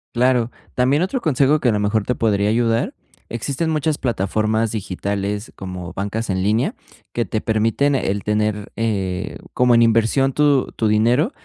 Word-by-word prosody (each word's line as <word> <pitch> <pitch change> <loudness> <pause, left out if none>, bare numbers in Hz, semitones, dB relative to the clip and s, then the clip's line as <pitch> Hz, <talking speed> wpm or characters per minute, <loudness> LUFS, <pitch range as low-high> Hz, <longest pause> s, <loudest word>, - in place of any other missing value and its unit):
Claro, 125 -1 +2 0.2
también 135 +6 +2
otro 240 +7 -2
consejo 145 - +3
que 130 - +2
a - - +4
lo 105 - 0
mejor 105 +1 +1
te 125 - -1
podría 105 -2 +1
ayudar, 115 0 +1 0.3
existen 140 +7 -2
muchas 155 -1 0
plataformas 110 -1 0
digitales 100 +1 -3
como 90 -2 -7
bancas 100 +3 -3
en 95 0 -1
línea, 105 +5 +1 0.4
que 120 - 0
te 110 - -2
permiten 115 +6 +1
el 100 -6 -1
tener, 105 -1 -1
eh, 100 -4 -2 0.2
como 125 -1 +4
en 115 - +6
inversión 115 +4 +2
tu 145 -2 +2
tu 110 - -1
dinero 120 - +2
115 Hz, 165 wpm, -20 LUFS, 105-125 Hz, 0.4 s, en